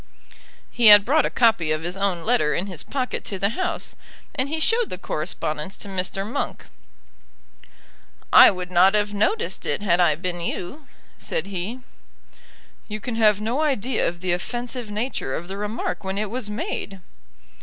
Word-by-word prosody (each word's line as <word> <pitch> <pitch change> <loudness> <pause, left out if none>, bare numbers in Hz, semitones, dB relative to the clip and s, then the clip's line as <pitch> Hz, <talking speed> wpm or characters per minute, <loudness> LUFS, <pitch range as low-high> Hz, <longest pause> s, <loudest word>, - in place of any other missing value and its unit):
He 240 -2 +3
had 205 -1 +9
brought 300 +4 +3
a - - -3
copy 220 -10 +3
of 155 +1 -1
his 175 +2 -3
own 195 -4 -1
letter 225 -10 +2
in 180 - -1
his 185 -6 -6
pocket 255 -2 -3
to 195 - -4
the 195 +2 +1
House, 355 - -3 0.4
and 260 +2 -1
he 320 +1 -2
showed 455 +7 +1
the - - -4
correspondence 155 0 -4
to - - -8
Mr. 195 0 -2
Monk. 255 +6 -4 1.7
"I - - +10
would 180 -1 -5
not 185 +3 +5
have 205 0 +1
noticed 430 - 0
it, - - -1
had 180 -3 +2
I 170 -4 +4
been 175 +1 -4
you," 225 - -5 0.3
said - - -2
he. 200 +6 -4 1.1
"You 215 0 -5
can 240 +3 -5
have 215 -2 +4
no 230 +7 -1
idea 265 -5 0
of 170 0 -5
the 185 -1 0
offensive 240 +5 -4
nature 210 - -3
of 175 - -6
the 190 - -6
remark 210 +2 -3
when 190 0 -3
it 210 0 -2
was 240 -3 -3
made." 200 -1 -4
205 Hz, 175 wpm, -23 LUFS, 180-240 Hz, 1.7 s, I